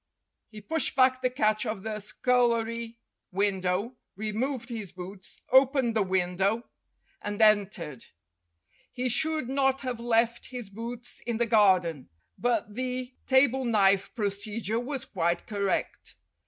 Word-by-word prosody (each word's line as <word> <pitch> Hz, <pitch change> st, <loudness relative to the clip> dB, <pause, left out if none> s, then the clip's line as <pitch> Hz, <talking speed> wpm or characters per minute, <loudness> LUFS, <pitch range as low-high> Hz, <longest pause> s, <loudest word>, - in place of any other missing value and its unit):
He 215 Hz, -1 st, -11 dB
pushed 320 Hz, +9 st, +1 dB
back 255 Hz, -1 st, +4 dB
the 255 Hz, -, +2 dB
catch 215 Hz, -4 st, +1 dB
of 210 Hz, -3 st, -4 dB
the 215 Hz, -1 st, -4 dB
scullery 230 Hz, +1 st, 0 dB, 0.3 s
window, 195 Hz, +4 st, 0 dB, 0.2 s
removed 230 Hz, +5 st, -3 dB
his 215 Hz, -6 st, -5 dB
boots, 190 Hz, +1 st, -10 dB
opened 260 Hz, -2 st, +4 dB
the 220 Hz, -, +3 dB
window, 190 Hz, +3 st, 0 dB, 0.6 s
and 205 Hz, 0 st, -4 dB
entered. 200 Hz, -, +2 dB, 0.9 s
He 255 Hz, 0 st, -1 dB
should 310 Hz, +2 st, +1 dB
not 270 Hz, 0 st, +1 dB
have 250 Hz, -3 st, -4 dB
left 235 Hz, 0 st, +1 dB
his 245 Hz, -6 st, -8 dB
boots 235 Hz, +3 st, -7 dB
in 235 Hz, -2 st, -1 dB
the 235 Hz, -, +2 dB
garden, 185 Hz, -, +3 dB, 0.3 s
but 230 Hz, -4 st, -1 dB
the 255 Hz, +1 st, -3 dB
table 265 Hz, 0 st, +4 dB
knife 200 Hz, -4 st, +2 dB
procedure 210 Hz, 0 st, -2 dB
was 265 Hz, +1 st, -3 dB
quite 170 Hz, -6 st, -1 dB
correct. 200 Hz, -2 st, -2 dB
225 Hz, 125 wpm, -28 LUFS, 200-250 Hz, 0.9 s, back